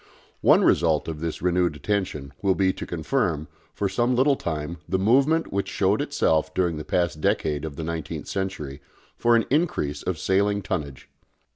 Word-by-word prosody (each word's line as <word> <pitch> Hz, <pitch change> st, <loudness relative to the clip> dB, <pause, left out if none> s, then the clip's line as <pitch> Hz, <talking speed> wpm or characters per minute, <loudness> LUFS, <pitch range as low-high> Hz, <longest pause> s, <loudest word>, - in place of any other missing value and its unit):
One -, -, +5 dB
result 80 Hz, -3 st, +3 dB
of 80 Hz, -2 st, -4 dB
this 80 Hz, +1 st, -4 dB
renewed 90 Hz, -3 st, +2 dB
attention 75 Hz, -5 st, -2 dB
will 95 Hz, -2 st, +2 dB
be 95 Hz, -1 st, +2 dB
to -, -, -7 dB
confirm, 85 Hz, -, -1 dB, 0.3 s
for 100 Hz, -, 0 dB
some 120 Hz, +6 st, +1 dB
little 135 Hz, +3 st, +4 dB
time, 80 Hz, -, -4 dB
the 95 Hz, -, +1 dB
movement 135 Hz, +11 st, +3 dB
which 100 Hz, 0 st, -1 dB
showed 100 Hz, +6 st, +1 dB
itself 145 Hz, -, +1 dB
during 85 Hz, -4 st, +1 dB
the 75 Hz, -, -5 dB
past 85 Hz, -3 st, -1 dB
decade 75 Hz, -1 st, 0 dB
of 80 Hz, -3 st, -5 dB
the 80 Hz, -, -5 dB
nineteenth 80 Hz, -1 st, -4 dB
century 75 Hz, -8 st, -4 dB, 0.3 s
for 120 Hz, 0 st, +3 dB
an 115 Hz, -, +3 dB
increase 145 Hz, -, 0 dB
of -, -, -2 dB
sailing 100 Hz, +1 st, +1 dB
tonnage. 75 Hz, -9 st, -4 dB
90 Hz, 170 wpm, -25 LUFS, 80-105 Hz, 0.3 s, One